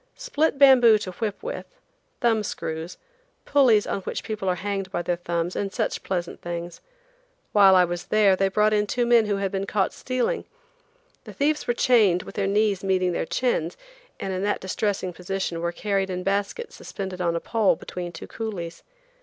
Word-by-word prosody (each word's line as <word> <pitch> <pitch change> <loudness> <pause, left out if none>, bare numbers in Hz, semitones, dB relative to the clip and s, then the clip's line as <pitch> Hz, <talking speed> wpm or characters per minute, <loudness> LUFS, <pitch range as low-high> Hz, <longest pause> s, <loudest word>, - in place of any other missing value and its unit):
Split 320 - 0
bamboo 255 -5 +7
to 200 -3 -6
whip 210 - -4
with, - - -5 0.5
thumb 225 -2 +3
screws, 160 -4 -5 0.5
pulleys 250 -7 +4
on 195 - -2
which - - -4
people 215 -4 -3
are 180 - +1
hanged 195 0 -3
by 175 - -2
their 175 0 -1
thumbs, 170 0 -2
and 200 -1 -2
such - - -2
pleasant 175 -2 -4
things. 175 0 -6 0.7
While 195 -2 +7
I 180 -1 +6
was 175 0 -5
there 210 -3 +4
they 195 +1 +2
brought 210 +2 +2
in 210 0 +2
two 240 +3 0
men 235 -2 +4
who 205 - +1
had 195 -1 -2
been 195 0 -2
caught 195 -1 0
stealing. 255 - -2 0.8
The - - -9
thieves 300 +2 0
were 240 - +1
chained 210 -9 +4
with - - -10
their 200 -1 -1
knees 205 -1 +1
meeting 185 -2 +1
their 170 - -2
chins, 180 -10 -1 0.4
and 195 - -3
in 185 - -2
that 205 +1 0
distressing 190 -1 -2
position 180 -1 -3
were 170 0 -1
carried 195 +1 -1
in 180 0 -3
baskets 200 - -2
suspended 190 -2 -6
on 170 -1 +1
a - - 0
pole 220 +2 +2
between 175 -1 -6
two 165 - -9
coolies. 195 -7 -6
195 Hz, 185 wpm, -25 LUFS, 180-220 Hz, 0.8 s, bamboo